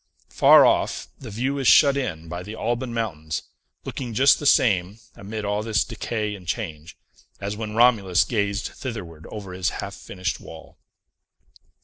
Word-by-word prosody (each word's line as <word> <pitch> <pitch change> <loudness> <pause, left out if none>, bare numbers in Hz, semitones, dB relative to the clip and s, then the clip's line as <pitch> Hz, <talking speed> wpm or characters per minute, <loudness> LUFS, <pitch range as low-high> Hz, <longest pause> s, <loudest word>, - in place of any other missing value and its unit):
Far - - +7
off, - - +1
the 125 - -9
view 130 +7 -2
is 135 - 0
shut 140 +1 +7
in 85 -12 -3
by 90 +2 -5
the 105 +4 -8
Alban 120 +2 -2
Mountains, 80 -10 -3 0.4
looking 120 -4 -5
just 135 +4 +5
the 145 - -1
same, 100 -6 +3 0.2
amid 105 +2 -6
all 105 +1 -1
this 110 0 +1
decay 110 -2 -3
and 95 -4 -11
change, 80 -1 -5 0.4
as 100 +1 -4
when 105 0 -5
Romulus 110 -7 +4
gazed 100 -3 -1
thitherward 90 - -8
over 100 -4 -8
his 90 0 0
half - - -5
finished 90 -6 -4
wall. 80 0 -13
105 Hz, 155 wpm, -24 LUFS, 90-120 Hz, 0.4 s, Far